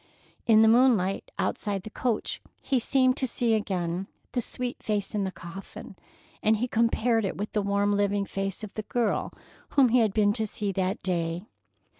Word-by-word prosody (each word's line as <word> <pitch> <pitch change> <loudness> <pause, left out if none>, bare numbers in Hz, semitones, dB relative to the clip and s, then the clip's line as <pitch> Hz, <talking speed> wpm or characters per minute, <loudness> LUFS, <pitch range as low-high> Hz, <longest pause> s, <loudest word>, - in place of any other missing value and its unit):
In 220 -1 +7
the - - +6
moonlight 225 -5 +3
outside 200 -3 -2
the 215 - -8
coach 235 -2 -2 0.2
he 265 - 0
seemed 255 +1 +3
to 260 - 0
see 235 -1 0
again 185 -3 -1 0.2
the 245 - 0
sweet 250 +1 -4
face 210 -1 -2
in 205 -2 0
the 190 - -3
coffin, 170 +2 -10 0.5
and 215 +1 +3
he 245 +4 -1
compared 230 0 +2
it 195 - -2
with 205 +2 -4
the 210 - 0
warm 200 +1 +1
living 200 0 +1
face 195 +1 -4
of 215 - -7
the 215 - -3
girl 225 +1 -1 0.5
whom 265 -3 +7
he 250 +2 +4
had 220 -3 +3
been 205 0 +3
to 220 0 -1
see 205 0 -2
that 190 0 -1
day. 170 0 -1
210 Hz, 185 wpm, -27 LUFS, 195-230 Hz, 0.5 s, In